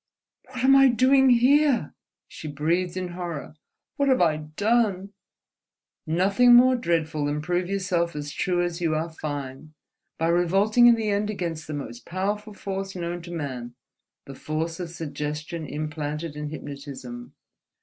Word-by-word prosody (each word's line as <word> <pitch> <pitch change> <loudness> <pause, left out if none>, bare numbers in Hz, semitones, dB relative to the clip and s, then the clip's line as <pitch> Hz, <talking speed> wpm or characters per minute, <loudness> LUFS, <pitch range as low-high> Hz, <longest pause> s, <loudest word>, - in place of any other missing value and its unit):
"What 255 0 -6
am 270 +1 +6
I 270 0 +7
doing 260 +2 +4
here?" 255 - +4 0.3
she 155 - -9
breathed 170 +5 -1
in 185 -1 -3
horror. 175 -5 -6 0.4
"What 280 -1 +2
have 260 - +4
I 160 -3 +3
done?" 200 +5 0 0.9
"Nothing 200 +9 +5
more 255 +1 +6
dreadful 160 -8 -1
than 145 +1 -1
prove 175 +3 -1
yourself 185 -4 -1
as 145 -1 -5
true 175 +3 0
as 175 0 -3
you 160 -2 +1
are 160 +2 -2
fine, 145 -1 -6 0.4
by 165 +1 0
revolting 195 +7 +4
in 240 - +7
the 220 -2 -1
end 205 +1 0
against 170 -6 -4
the 155 - -4
most 120 -4 -7
powerful 205 +4 -3
force 195 -1 -5
known 175 0 -4
to 170 +1 -10
man, 130 -7 -5 0.5
the 135 - -9
force 160 +4 -4
of 175 -2 -4
suggestion 150 0 -5
implanted 150 +1 -4
in 150 0 -5
hypnotism. 140 -5 -8
170 Hz, 150 wpm, -25 LUFS, 150-200 Hz, 0.9 s, I